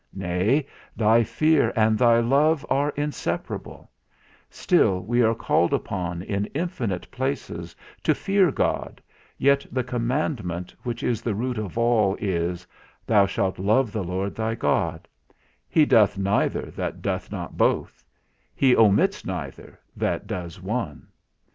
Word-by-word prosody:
Nay, 95 +10 +1 0.3
thy 115 +1 +4
fear, 155 +6 +2
and 110 -1 +3
thy 115 0 +4
love 145 +5 +2
are 140 +2 +2
inseparable; 145 0 -4 0.6
still 90 -1 +2
we 120 +4 +1
are 115 -1 +3
called - - +2
upon, 90 -2 -4
in 100 +1 -2
infinite 130 - -2
places, 105 -11 -4 0.3
to - - +2
fear 195 -2 +2
God, - - -2 0.4
yet 140 0 +3
the 130 - -1
commandment, 120 - -2
which 120 -2 -5
is 115 -3 0
the 115 -3 -2
root 120 +1 -2
of 105 -1 -5
all 115 -4 +3
is, 90 -2 -2 0.4
Thou 100 -3 +4
shalt 95 -1 -2
love 110 +5 +2
the 105 -2 -3
Lord 95 +3 -3
thy 110 0 -2
God; - - -1 0.6
he 155 - +4
doeth 105 -6 +4
neither 100 +1 0
that - - -5
doeth - - -3
not - - -6
both; - - 0 0.5
he 130 -2 +4
omits 115 - +3
neither, 90 -8 -7 0.2
that - - -2
does 85 -1 -6
one. 95 -6 -4
110 Hz, 135 wpm, -24 LUFS, 95-130 Hz, 0.6 s, thy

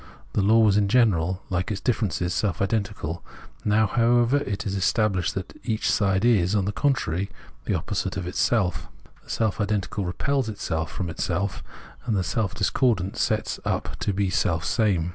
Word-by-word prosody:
The - - +2
law 110 +4 +5
was 105 -2 +4
in 105 -1 +3
general, 95 -6 +2
hke 90 0 0
its 105 -3 -2
differences, 95 - 0
self 90 0 0
identical; 100 -5 -2 0.4
now, 105 +1 +3
however, 120 +4 +3
it 100 -8 -3
is 95 - -2
established 95 -1 +1
that 95 -1 -5
each 110 -2 0
side 100 0 +2
is, 105 -5 +3
on 100 -3 +2
the 100 - 0
contrary, 100 - 0 0.4
the - - 0
opposite 95 0 -2
of 95 - -3
itself. 90 +1 0 0.4
The - - -21
self 110 -1 0
identical 105 0 -1
repels 125 +8 -1
itself 80 -6 -3
from 95 - -3
itself, 90 +3 -2 0.4
and 115 - +1
the 95 - +1
self 100 +1 -1
discordant 110 -6 +1
sets 110 0 0
up - - -2
to - - 0
be 100 -1 0
selfsame. 90 +1 +1
100 Hz, 165 wpm, -25 LUFS, 90-110 Hz, 0.4 s, law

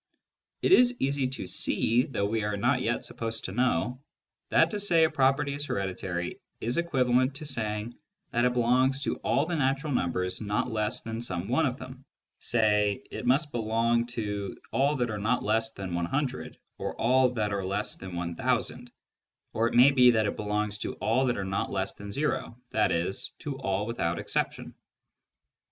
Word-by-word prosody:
It - - +2
is 250 -8 +6
easy 135 0 +1
to 130 - -5
see, 120 +3 +1
though 100 -7 -1
we 110 +1 -1
are 105 -1 -1
not 125 +5 +2
yet 120 -1 -1
supposed 115 -1 -4
to - - -4
know, 125 +2 0 0.5
that - - +4
to 210 - -2
say 175 -5 +4
a 160 - +3
property 140 +2 +2
is 145 +1 -3
hereditary 90 -2 -3 0.2
is 120 +8 -1
equivalent 130 -5 +2
to 155 +2 -6
saying 110 -3 -2 0.4
that 120 - +1
it 125 0 +3
belongs 130 +3 +2
to - - -1
all 140 - +1
the 175 +1 -2
natural 135 0 0
numbers 90 -2 -1
not 105 +3 -1
less 110 -1 -1
than 115 0 -5
some 95 -5 -3
one 140 +5 +2
of 125 0 -3
them, 130 0 -10 0.4
e.g. 120 - -1 0.5
it - - -5
must 145 +4 +2
belong 115 0 +1
to 105 -4 -4
all 140 +3 +2
that 120 -4 -1
are 105 - -3
not 115 +5 0
less 110 +1 +1
than 95 -4 -6
100, 130 - -2 0.2
or - - -3
all 130 +2 +4
that 105 -4 -1
are 100 -1 -1
less 100 +3 -2
than 95 -2 -8
1000, 120 +7 -1 0.6
or 115 +1 +2
it - - -3
may 125 +4 +8
be 125 -2 +6
that 110 -3 +3
it 100 - -1
belongs 105 0 -2
to - - -4
all 130 +4 +1
that 120 - 0
are 100 - -2
not 95 0 -2
less 95 0 -2
than 100 - -10
o, 140 +1 -2 0.2
i.e. 90 -5 +2 0.3
to 145 -3 -5
all 100 -4 -1
without 90 -7 -1
exception. - - -2
120 Hz, 180 wpm, -28 LUFS, 105-130 Hz, 0.6 s, may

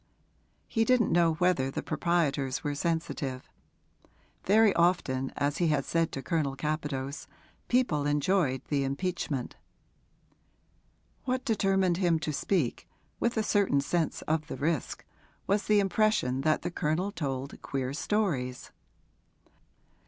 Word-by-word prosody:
He 225 - +1
didn't 240 -2 +3
know 170 -1 +4
whether 170 -6 +2
the - - -4
proprietors 150 -5 0
were 145 - -1
sensitive; 145 -4 -2 1.0
very 210 +1 +5
often, 140 -7 +1
as 145 0 0
he 175 - +2
had 150 -3 +1
said 165 -1 0
to 135 - -5
Colonel 155 -6 -1
Capadose, 145 -2 -3 0.4
people 205 - +1
enjoyed 145 -2 +1
the 140 -2 +1
impeachment. 140 -2 -3 1.7
What 255 0 -1
determined 195 -6 +2
him 175 -3 +2
to 155 -1 -3
speak, 150 -3 -1 0.3
with 235 0 0
a 220 - +2
certain 200 -9 +2
sense 160 +3 -1
of 155 0 -1
the - - -6
risk, 155 -2 -2 0.4
was 205 +2 +1
the 210 -1 +4
impression 195 -10 +1
that 155 +2 +1
the - - -2
Colonel 170 +5 -1
told 135 -6 -4
queer 135 -1 -3
stories. 145 -7 -1
160 Hz, 125 wpm, -29 LUFS, 140-190 Hz, 1.7 s, very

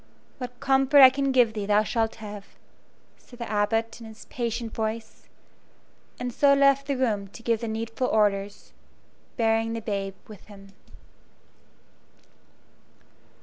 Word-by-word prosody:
"What 250 -1 -7
comfort 270 +1 +4
I 260 - +10
can 275 0 -1
give 245 -4 +3
thee 210 -2 -4
thou 210 +1 +3
shalt 225 +1 -1
have," 210 -2 -9 0.7
said 245 - -16
the 235 - -6
Abbot, 225 +2 -1
in 225 - -9
his 220 0 -13
patient 235 -2 -3
voice, 220 0 -5 0.9
and 245 -1 -4
so 280 +2 +4
left 275 0 +3
the 280 -2 -1
room 215 -6 -1
to 230 +4 -14
give 230 -1 0
the 230 - -3
needful 225 +3 -3
orders, 205 -2 -1 0.6
bearing 225 -1 +1
the 230 - -3
babe 200 -3 -4
with 210 -3 -13
him. 195 -2 -14
225 Hz, 140 wpm, -25 LUFS, 210-250 Hz, 0.9 s, I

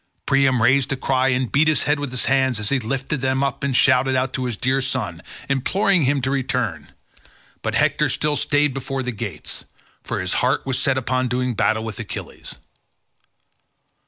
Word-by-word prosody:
Priam 135 -3 +3
raised 130 +3 +3
a - - +1
cry 130 0 +1
and 130 -2 0
beat 150 +3 +3
his 155 -2 +2
head 145 +1 +1
with 145 -2 -3
his 125 0 -1
hands 130 -3 +2
as 105 - 0
he 140 - +2
lifted 135 +4 -3
them 130 +1 +1
up 135 -1 -2
and 140 -2 0
shouted 130 0 +4
out 130 +1 0
to 130 - -2
his 120 -4 -3
dear 130 +3 +1
son, 105 -11 -3 0.3
imploring 180 +8 +2
him 140 +1 +1
to 130 - 0
return; 125 - -2 0.7
but - - -2
Hector - - +2
still 150 0 0
stayed 145 -1 +2
before 135 0 -3
the 125 - -2
gates, 100 -9 -5 0.4
for - - -4
his 90 0 -1
heart 125 +2 +1
was 130 -1 -1
set 135 -1 +1
upon 130 0 0
doing 125 0 -1
battle 110 0 +1
with 110 -3 -6
Achilles. - - -7
130 Hz, 190 wpm, -21 LUFS, 125-135 Hz, 0.7 s, shouted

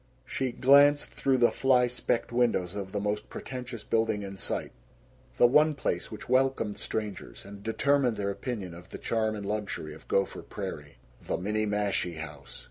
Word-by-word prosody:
She 130 -2 -2
glanced 140 +3 +5
through 135 -1 +1
the 120 -1 +5
fly 130 -2 +4
specked 120 -1 -1
windows 115 -7 +1
of 100 -2 -5
the 100 - -1
most 105 +1 -2
pretentious 125 -3 -6
building 110 -2 +1
in 100 0 -6
sight, 95 - -3 0.7
the - - +7
one 150 +5 +5
place 85 -10 -2
which 110 - -8
welcomed 130 -5 +1
strangers 105 -3 -4
and 100 0 -10
determined 125 +2 +2
their 100 -1 -1
opinion 100 -5 -5
of 85 +2 -12
the - - -7
charm 110 -1 0
and 100 -1 -6
luxury 100 -7 -3
of - - -14
Gopher 95 0 0
Prairie 75 -1 -7 0.2
the - - -2
Minniemashie 105 -3 -1
House. 75 -3 -8
110 Hz, 165 wpm, -29 LUFS, 100-125 Hz, 0.7 s, the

